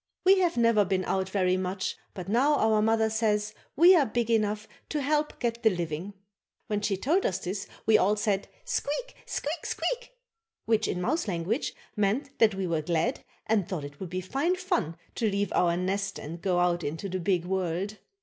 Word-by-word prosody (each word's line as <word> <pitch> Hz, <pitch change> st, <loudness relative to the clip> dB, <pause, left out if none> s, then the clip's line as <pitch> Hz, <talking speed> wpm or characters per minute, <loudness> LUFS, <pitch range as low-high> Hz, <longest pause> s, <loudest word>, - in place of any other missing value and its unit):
We 380 Hz, +1 st, +7 dB
have 350 Hz, -5 st, +1 dB
never 230 Hz, -3 st, +4 dB
been 190 Hz, -1 st, 0 dB
out 190 Hz, 0 st, 0 dB
very 185 Hz, -2 st, +2 dB
much 185 Hz, +1 st, -2 dB, 0.2 s
but 185 Hz, -3 st, -6 dB
now, 260 Hz, +8 st, +3 dB
our 220 Hz, -4 st, +3 dB
mother 220 Hz, 0 st, +3 dB
says, 215 Hz, -1 st, 0 dB, 0.2 s
we 350 Hz, +5 st, +8 dB
are 320 Hz, -, +5 dB
big 235 Hz, +1 st, -1 dB
enough 215 Hz, -1 st, +1 dB, 0.2 s
to 300 Hz, -, -1 dB
help 300 Hz, +2 st, 0 dB
get 235 Hz, -1 st, -1 dB
the 225 Hz, -, +5 dB
living. 175 Hz, +1 st, -4 dB, 0.5 s
When 210 Hz, -1 st, -1 dB
she 200 Hz, -2 st, 0 dB
told 320 Hz, -, +2 dB
us 185 Hz, -, 0 dB
this, 195 Hz, +2 st, -4 dB, 0.2 s
we 220 Hz, -1 st, +6 dB
all 205 Hz, +3 st, +3 dB
said: 205 Hz, -2 st, 0 dB, 0.2 s
"Squeak, -, -, -2 dB
squeak, 305 Hz, +4 st, -3 dB
squeak," -, -, -3 dB, 0.5 s
which, 220 Hz, -1 st, +2 dB
in 180 Hz, -, -2 dB
mouse 310 Hz, -, 0 dB
language, 190 Hz, -, -1 dB, 0.2 s
meant 235 Hz, +8 st, 0 dB
that 215 Hz, -3 st, +5 dB
we 190 Hz, -1 st, -2 dB
were 165 Hz, -3 st, 0 dB
glad 165 Hz, +1 st, 0 dB, 0.2 s
and 210 Hz, -5 st, +1 dB
thought 175 Hz, -6 st, -3 dB
it 145 Hz, 0 st, -11 dB
would 190 Hz, -, -5 dB
be 185 Hz, +1 st, -3 dB
fine 275 Hz, -, 0 dB
fun 195 Hz, -, -1 dB, 0.2 s
to 225 Hz, -, 0 dB
leave 200 Hz, -1 st, -1 dB
our 170 Hz, -1 st, +3 dB
nest 195 Hz, +2 st, -1 dB
and 165 Hz, +3 st, -7 dB
go 180 Hz, -2 st, +1 dB
out 175 Hz, -1 st, +2 dB
into 160 Hz, +7 st, -3 dB
the 185 Hz, 0 st, -3 dB
big 175 Hz, -1 st, +1 dB
world. 190 Hz, +2 st, -2 dB
205 Hz, 195 wpm, -28 LUFS, 185-235 Hz, 0.5 s, we